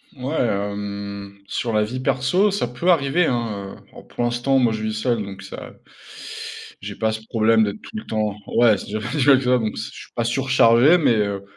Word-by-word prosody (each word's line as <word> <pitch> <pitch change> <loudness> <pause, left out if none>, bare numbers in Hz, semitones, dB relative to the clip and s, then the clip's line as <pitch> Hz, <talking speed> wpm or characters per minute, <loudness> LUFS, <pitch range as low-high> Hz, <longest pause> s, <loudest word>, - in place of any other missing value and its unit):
Ouais, 135 +4 -4
hem, 100 -1 -4
sur 115 +2 -2
la 105 0 +3
vie 125 +4 -4
perso, 135 - +2
ça 195 -11 -1
peut 125 +9 -2
arriver 160 +1 +2
hein, 110 -7 -3
heu, - - -21
oh - - -12
pour - - -5
l'instant 120 +3 +1
moi 120 -3 +3
je 110 0 -4
vis 110 - -2
seul 110 0 -1
donc 100 -1 -9
ça 95 - -9 1.1
j'ai 100 +1 -6
pas 110 +1 0
ce 110 0 -5
problème 110 0 +3
d'être 105 0 -3
tout 220 - -9
le 215 - -7
temps 105 -2 -1
ouais, 115 -4 +4
c'est 100 - -9
pas 105 - -5
si 145 -4 0
mal 140 -2 +7
que - - -5
ça 125 0 +4
bon 110 -3 -2
c - - -5
je - - -12
suis - - -24
pas 120 - 0
surchargé, 130 +3 +4
mais, 125 -7 +3
heu, 100 -2 -1
115 Hz, 225 wpm, -22 LUFS, 105-130 Hz, 1.1 s, mal